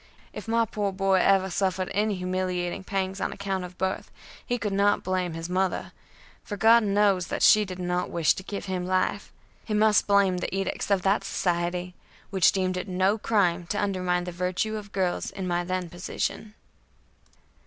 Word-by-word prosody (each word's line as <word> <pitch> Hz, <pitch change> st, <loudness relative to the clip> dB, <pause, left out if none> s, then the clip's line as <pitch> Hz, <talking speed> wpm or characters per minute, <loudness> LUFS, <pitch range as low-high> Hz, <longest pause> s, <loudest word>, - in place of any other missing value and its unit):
If -, -, -8 dB
my 230 Hz, 0 st, +2 dB
poor 205 Hz, -2 st, -2 dB
boy 195 Hz, 0 st, +2 dB
ever 190 Hz, 0 st, +3 dB
suffered 185 Hz, 0 st, -1 dB
any 210 Hz, +1 st, +1 dB
humiliating 180 Hz, 0 st, -2 dB
pangs 190 Hz, 0 st, -2 dB
on -, -, -1 dB
account 195 Hz, -2 st, -3 dB
of 180 Hz, 0 st, -9 dB
birth, 190 Hz, 0 st, -2 dB, 0.3 s
he 245 Hz, -, -1 dB
could 210 Hz, -3 st, -3 dB
not 200 Hz, +1 st, +2 dB
blame 185 Hz, -2 st, -1 dB
his 165 Hz, 0 st, -5 dB
mother, 185 Hz, +1 st, -1 dB, 0.5 s
for 205 Hz, -, -6 dB
God 225 Hz, +3 st, +6 dB
knows 200 Hz, -3 st, +2 dB
that -, -, -2 dB
she 215 Hz, 0 st, +6 dB
did 185 Hz, -2 st, -7 dB
not 180 Hz, 0 st, -2 dB
wish 170 Hz, -2 st, +2 dB
to -, -, -7 dB
give 200 Hz, +1 st, -6 dB
him 185 Hz, -2 st, -2 dB
life; 185 Hz, +2 st, -1 dB, 0.3 s
he 215 Hz, -, -2 dB
must 215 Hz, 0 st, +4 dB
blame 200 Hz, -3 st, +3 dB
the 185 Hz, -, -3 dB
edicts 195 Hz, +1 st, -2 dB
of 195 Hz, -3 st, +2 dB
that 195 Hz, +2 st, +2 dB
society 175 Hz, 0 st, -1 dB, 0.4 s
which 190 Hz, -3 st, +4 dB
deemed 185 Hz, -1 st, -1 dB
it 180 Hz, -, -4 dB
no 190 Hz, +3 st, +1 dB
crime 180 Hz, -6 st, +1 dB
to 205 Hz, +3 st, -2 dB
undermine 180 Hz, -3 st, 0 dB
the 180 Hz, -, -5 dB
virtue 180 Hz, +5 st, -2 dB
of 205 Hz, -2 st, -7 dB
girls 185 Hz, -2 st, -1 dB
in 190 Hz, -2 st, -5 dB
my 175 Hz, 0 st, 0 dB
then 185 Hz, 0 st, -2 dB
position. 180 Hz, +5 st, -4 dB
190 Hz, 185 wpm, -26 LUFS, 180-200 Hz, 0.5 s, God